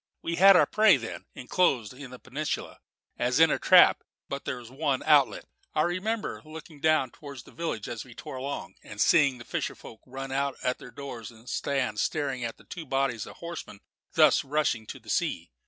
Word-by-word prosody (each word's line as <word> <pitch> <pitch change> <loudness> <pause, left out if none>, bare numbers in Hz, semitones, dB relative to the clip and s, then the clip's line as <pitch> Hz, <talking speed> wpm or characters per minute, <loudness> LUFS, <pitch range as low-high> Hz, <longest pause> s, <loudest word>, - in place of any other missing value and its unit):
We 170 0 -2
had 195 +2 +8
our - - +6
prey, 215 -6 +5
then, 115 -2 -7
enclosed 125 - +1
in 135 0 -10
that 125 0 -12
peninsula 145 +4 -4 0.4
as 125 +3 +1
in 165 -1 +6
a - - 0
trap; - - +6 0.3
but 140 0 -5
there 130 - -3
was 120 -1 -11
one 140 -1 -1
outlet. 145 -3 +4 0.3
I 155 - +3
remember 200 +6 -2
looking 155 -1 -11
down 155 -4 +2
towards 140 -4 -10
the - - -16
village 160 -11 -4
as 115 - -5
we 125 -3 -15
tore - - -8
along, 140 +2 -5
and 100 - -11
seeing 140 -2 +4
the 120 - -11
fisher - - -3
folk 110 - -13
run 135 +1 -6
out 140 0 -1
at 125 - 0
their - - -10
doors 120 -3 -8
and 115 0 -17
stand 130 -7 -1
staring 135 -5 -1
at 115 -1 -4
the - - -18
two 165 -4 -8
bodies 135 -4 -1
of - - -11
horsemen 170 -11 -8 0.3
thus - - +5
rushing 135 -6 0
to - - -8
the - - -24
sea. - - -1
135 Hz, 205 wpm, -28 LUFS, 125-155 Hz, 0.4 s, had